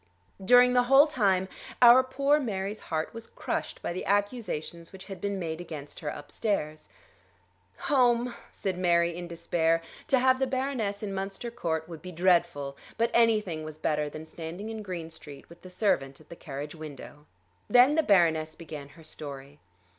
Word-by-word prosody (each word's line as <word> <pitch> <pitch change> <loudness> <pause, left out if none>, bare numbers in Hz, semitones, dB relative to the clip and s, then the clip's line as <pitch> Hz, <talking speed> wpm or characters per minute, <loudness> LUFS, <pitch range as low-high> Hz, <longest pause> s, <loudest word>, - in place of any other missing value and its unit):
During 245 +4 +6
the 250 - +5
whole 270 +3 +7
time 195 -10 +1 0.3
our 245 +1 +9
poor 275 +3 +2
Mary's 205 -5 -3
heart 160 0 -3
was 230 0 -8
crushed - - -4
by - - -2
the 185 - -5
accusations 200 -5 -2
which 190 -1 -11
had 195 -3 -9
been 200 -1 -2
made 165 -2 -4
against 150 -4 -8
her 155 -4 -4
upstairs. 155 0 -3 0.9
"Home," 245 -3 +2 0.2
said 185 -2 -4
Mary 170 -1 +2
in 175 0 -6
despair. 165 -1 +1 0.3
To 275 -4 +4
have 260 +1 +3
the 265 - +1
Baroness 255 -6 -2
in 200 -2 -3
Munster 195 +5 -4
Court 160 -9 -2
would 165 -3 -9
be 180 +1 -8
dreadful; 170 -6 +1 0.2
but 230 +1 +1
anything 215 -9 +2
was 155 -1 -8
better 150 -1 -1
than 155 +2 -8
standing 170 +6 -7
in 220 -1 -5
Green 175 -5 -6
Street 150 -3 -11
with 170 +1 -15
the 185 - -11
servant 140 -9 0
at 155 - -20
the - - -9
carriage 145 -1 -7
window. 150 -2 -10 0.4
Then 250 +3 +6
the 320 - +4
Baroness 160 - +3
began 150 -4 -9
her 165 - -14
story. 145 -2 -9
180 Hz, 170 wpm, -28 LUFS, 160-230 Hz, 0.9 s, our